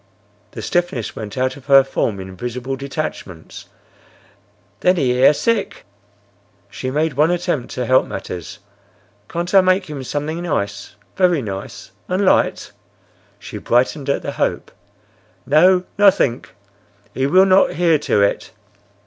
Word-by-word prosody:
The - - -7
stiffness 175 - -2
went 105 +1 -7
out 130 0 0
of 140 - -16
her 135 -1 +7
form 115 -6 -2
in 95 0 -9
visible 125 +6 -5
detachments. 135 - -7 1.1
"Then 180 +1 +3
he 135 -7 +1
air 125 +3 +5
sick!" 210 +7 -2 0.9
She 130 - -5
made 155 +3 0
one 150 +5 +2
attempt 175 -7 -2
to 125 - -2
help 130 +2 +3
matters. 90 -2 -7 0.7
"Can't 175 +2 -4
I 195 - +7
make 185 -2 +1
him 140 -3 -6
something 150 +5 -4
nice? 105 - -3 0.2
Very 180 -7 +2
nice?—And 115 - -5
light?" - - +1 0.7
She - - -9
brightened 130 +4 0
at 140 - 0
the - - -3
hope. - - -2 0.7
"No, 180 +6 +4 0.2
nothink. 190 -12 +2 0.6
He 130 +1 0
will 185 +5 +5
not 190 0 +4
hear 165 -2 +2
to 105 -7 +1
it." 100 - -1
140 Hz, 135 wpm, -19 LUFS, 125-175 Hz, 1.1 s, her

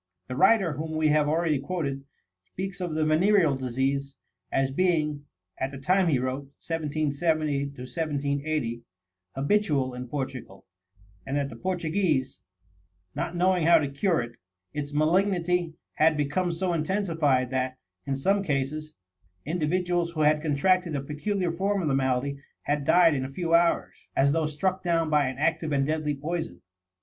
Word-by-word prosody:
The 125 - -5
writer 190 - +4
whom 160 +2 -4
we 155 -1 +3
have 150 0 +3
already 160 -2 +1
quoted 140 -3 -3 0.4
speaks 190 - -6
of 175 -3 -3
the 155 0 +1
venereal 165 -1 +4
disease 135 +2 -2 0.4
as 135 0 +1
being, 150 -3 0 0.3
at 130 - -1
the 140 - -8
time 185 +7 +2
he 150 -5 +3
wrote 130 +2 -2
(1770 155 -2 -1
1780), 140 -2 -2 0.5
habitual 140 -3 +1
in 125 0 -6
Portugal, 130 -7 -6 0.6
and 135 +7 -2
that 140 -1 -1
the - - -8
Portuguese 170 -3 -1 0.7
not 175 - -3
knowing 180 -2 +2
how 170 0 +8
to 150 -3 0
cure 165 - +1
it, 120 0 -10 0.4
its 145 -1 -4
malignity 175 +1 +1 0.2
had 155 0 +3
become 150 +5 0
so 175 +1 -1
intensified 160 -7 +1
that, 130 0 -1 0.3
in 135 - 0
some 195 +9 +1
cases, 150 -1 -2 0.5
individuals 175 +2 0
who 155 - -2
had 150 0 +4
contracted 165 +3 +2
a 140 - -1
peculiar 175 +6 -2
form 195 +4 0
of 170 - -1
the 140 - +1
malady 135 +1 0 0.2
had 145 -1 -1
died 170 -1 +5
in 130 -2 -1
a 130 - -4
few 165 +3 -2
hours, 170 0 +2
as 140 +1 +4
though 160 0 +1
struck 185 +5 -1
down 165 -3 +1
by 150 -2 +3
an 130 0 -4
active 160 +1 0
and 140 -1 +2
deadly 155 -1 -1
poison. 160 -2 -4
155 Hz, 155 wpm, -27 LUFS, 140-175 Hz, 0.7 s, how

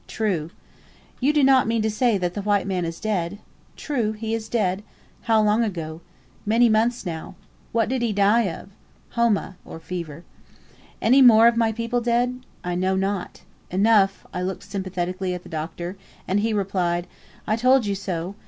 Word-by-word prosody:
"True." 185 -8 -2 0.7
"You 270 +3 +3
do 300 -2 +2
not 265 -2 +5
mean 225 -1 +1
to 220 - +1
say 225 0 +2
the 180 +2 -2
white 205 0 +1
man 185 -3 -1
is 165 0 -5
dead?" 200 -4 -2 0.4
"True 240 -8 -1
he 220 +1 -4
is 220 -1 -3
dead." 200 -4 0 0.5
"How 220 -1 +5
long 210 +2 +3
ago?" 165 -6 -4 0.4
"Many 230 +3 +4
months 225 +2 +1
now." 160 -3 -6 0.4
"What 225 -1 +1
did 255 +1 -1
he 235 -2 +1
die 205 +3 +3
of?" 175 - -9 0.4
"Homa 230 -5 0 0.3
(fever)." 170 -3 -6 0.8
"Any 260 +5 +5
more 230 -3 +8
of 235 - +4
my 230 -1 +2
people 230 +2 -2
dead?" 245 +1 0 0.2
"I 180 - -2
know 185 +2 0
not." 195 -1 -2 0.3
"Enough." 195 0 +3
I 180 - -3
looked 185 +1 -4
sympathetically 185 -1 -3
at 180 - -8
the - - -13
Doctor, 170 +4 -5 0.3
and 195 +2 +1
he 225 +2 0
replied, 185 -4 0 0.4
"I 215 - +1
told 255 +1 +3
you 200 - 0
so. 185 -2 -4
205 Hz, 170 wpm, -23 LUFS, 180-230 Hz, 0.8 s, more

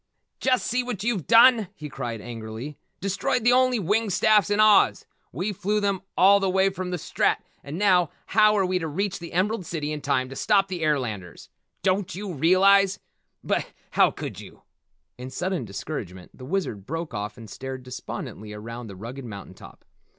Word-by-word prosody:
"Just 255 -1 +1
see 250 +2 +1
what 245 -6 -5
you've 220 -8 -1
done," 230 -2 +6
he 150 - -7
cried 120 -5 -5
angrily. 115 +4 -7 0.3
"Destroyed 195 +5 0
the 245 - +5
only 255 -1 +4
winged 210 +2 0
staffs 210 0 +4
in 205 0 +1
Oz. 215 -2 +5 0.3
We 185 - -2
flew 205 +3 0
them 200 -2 0 0.2
all 200 +2 +6
the 195 -1 0
way 190 +1 +3
from 185 -1 -5
the 180 - -2
Strat - - +1 0.3
and 145 +3 -6
now, 180 -4 +4 0.2
how 215 0 +4
are 195 - +3
we 185 0 0
to 165 - -3
reach 195 +6 -2
the 170 -1 -8
Emerald 195 +3 0
City 155 -3 -4
in 150 -1 -4
time 130 -2 0
to 135 - -8
stop 195 +3 +2
the 180 -3 -4
airlanders? 120 - -2 0.3
Don't 190 0 0
you 195 -1 -5
realize 190 +5 +4 0.5
but - - 0 0.2
how - - +5
could - - -7
you?" - - -13 0.6
In 125 +1 -6
sudden 180 0 -2
discouragement 95 - -7
the 125 - -10
Wizard 130 - -3
broke 165 -1 -4
off 105 +1 -4
and 115 -2 -10
stared 130 +4 -7
despondently 110 -4 -7
around 115 +3 -7
the 100 - -9
rugged 120 +7 -8
mountain 100 -4 -9
top. - - -15
180 Hz, 185 wpm, -25 LUFS, 130-200 Hz, 0.6 s, done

